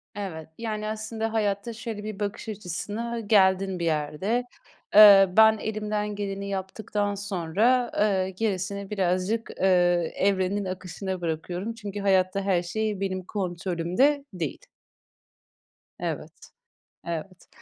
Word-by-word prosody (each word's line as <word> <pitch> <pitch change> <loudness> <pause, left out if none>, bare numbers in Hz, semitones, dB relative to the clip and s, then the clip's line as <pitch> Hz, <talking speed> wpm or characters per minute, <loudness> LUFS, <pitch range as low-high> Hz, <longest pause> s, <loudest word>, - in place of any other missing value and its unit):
Evet, 165 -6 -6
yani, 215 -2 -3
aslında 220 +1 -3
hayatta 210 +1 -1
şöyle 220 -2 -6
bir 215 -1 -6
bakış 205 +2 -4
açısına 210 +4 -4
geldin 190 -3 +3
bir 170 - -1
yerde. 160 +10 0 0.5
Eee, 200 -2 +10
"Ben 220 0 +7
elimden 210 -1 -3
geleni 200 -1 -4
yaptıktan 205 +1 -2
sonra, 205 +6 +1
eee, 195 -3 +2
gerisini 200 0 -3
birazcık, 195 +3 0
eee, - - +3 0.5
evrenin 195 +1 +1
akışına 185 0 -5
bırakıyorum. 175 +6 -3
Çünkü 205 -2 -6
hayatta 190 0 +2
her 190 -3 +1
şey 210 +2 -2
benim 185 -1 -2
kontrolümde 185 - 0
değil." 165 -6 -4 1.4
Evet, - - -6 0.5
evet. 170 +2 -6
200 Hz, 110 wpm, -26 LUFS, 185-215 Hz, 1.4 s, Eee